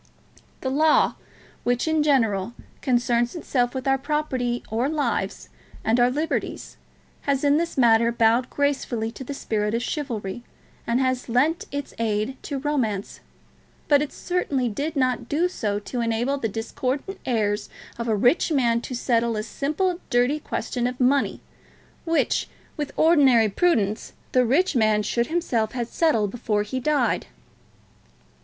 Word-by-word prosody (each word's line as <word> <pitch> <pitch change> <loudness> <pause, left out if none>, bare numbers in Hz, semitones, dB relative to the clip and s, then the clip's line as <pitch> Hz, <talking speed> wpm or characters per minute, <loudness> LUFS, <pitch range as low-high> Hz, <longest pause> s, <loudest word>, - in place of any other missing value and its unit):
The 260 - -2
Law, 310 +3 +4 0.5
which, 245 +4 0
in 315 -1 +2
general, 230 -8 +2 0.3
concerns 240 0 +1
itself 250 -6 -1
with 260 0 -3
our 270 0 +3
property 265 -4 -1
or 235 +5 0
lives 300 -2 -2 0.4
and 225 +2 +3
our 245 0 +5
liberties, 305 +5 -3 0.5
has 275 -1 +1
in 290 0 +4
this 335 -1 -2
matter 235 -2 +5
bowed 235 +2 +2
gracefully 265 -6 -1
to 265 - -8
the 280 +2 -6
spirit 210 -3 -1
of 235 - -1
chivalry 240 -8 -4 0.5
and 235 +1 +2
has 255 -1 0
lent 295 +9 +2
its 285 0 -5
aid 220 +2 -1
to 285 - -4
romance; 255 -8 -2 0.7
but 290 -2 +5
it 295 - -3
certainly 290 -8 -1
did 285 +9 -3
not 255 -3 0
do 325 +5 +2
so 210 - -2
to 235 +4 -4
enable 235 +5 0
the 225 - -1
discordant 260 - -3
heirs 210 -4 0 0.3
of 235 - -3
a 220 - +2
rich 245 - +3
man 235 -5 +2
to 250 - -5
settle 235 -2 +1
a 215 - -2
simple 325 - -1
dirty 250 +4 +2
question 245 -4 -2
of 250 0 -5
money, 270 +2 +2 0.6
which, 330 -1 +1 0.3
with 295 -2 -4
ordinary 270 -9 +5
prudence, 215 - +1 0.2
the 250 -2 +3
rich 310 +6 +2
man 215 -2 +3
should 235 +3 0
himself 245 -10 0
have 240 -2 -2
settled 225 -12 +1
before 215 -3 -1
he 235 +5 -4
died." 295 +3 +1
250 Hz, 150 wpm, -24 LUFS, 230-290 Hz, 0.7 s, our